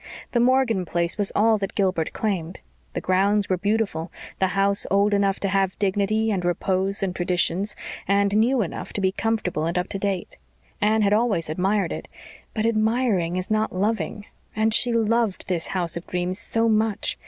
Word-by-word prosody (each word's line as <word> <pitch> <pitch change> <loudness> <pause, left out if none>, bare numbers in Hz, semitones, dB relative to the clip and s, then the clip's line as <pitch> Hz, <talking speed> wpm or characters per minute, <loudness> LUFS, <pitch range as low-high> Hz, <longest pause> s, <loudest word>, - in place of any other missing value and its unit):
The 240 - +1
Morgan 245 -5 +3
place 170 +2 -1
was 205 - +2
all 220 0 +4
that 195 -1 -4
Gilbert 185 -5 0
claimed. 185 -5 -3 0.3
The - - -3
grounds 200 +2 +2
were 185 - +2
beautiful, 200 -4 -1 0.3
the 190 - +3
house 200 +1 +2
old 200 +1 +3
enough 200 -1 +1
to 200 - 0
have 195 -1 0
dignity 205 +3 +1
and 190 -3 -1
repose 190 +3 0
and 185 -2 -2
traditions, 180 +2 0 0.3
and 200 0 +2
new 235 +2 +3
enough 170 - -6
to - - -1
be 190 -1 +2
comfortable 195 -7 -1
and 170 - -1
up 180 +1 -1
to 195 - -3
date. 195 -2 -3 0.4
Anne 215 +1 +3
had 200 0 +3
always 210 -8 +1
admired 190 +2 0
it; - - -7 0.5
but 215 0 0
admiring 215 -5 +1
is 185 +3 -4
not 215 -2 0
loving; 205 +1 -1 0.3
and 220 0 +2
she 240 - +4
loved 230 -2 +1
this 175 -3 -1
house 175 -3 -2
of 170 - -7
dreams 180 +2 -2
so 230 0 0
much. 220 -1 0
200 Hz, 180 wpm, -24 LUFS, 185-220 Hz, 0.5 s, all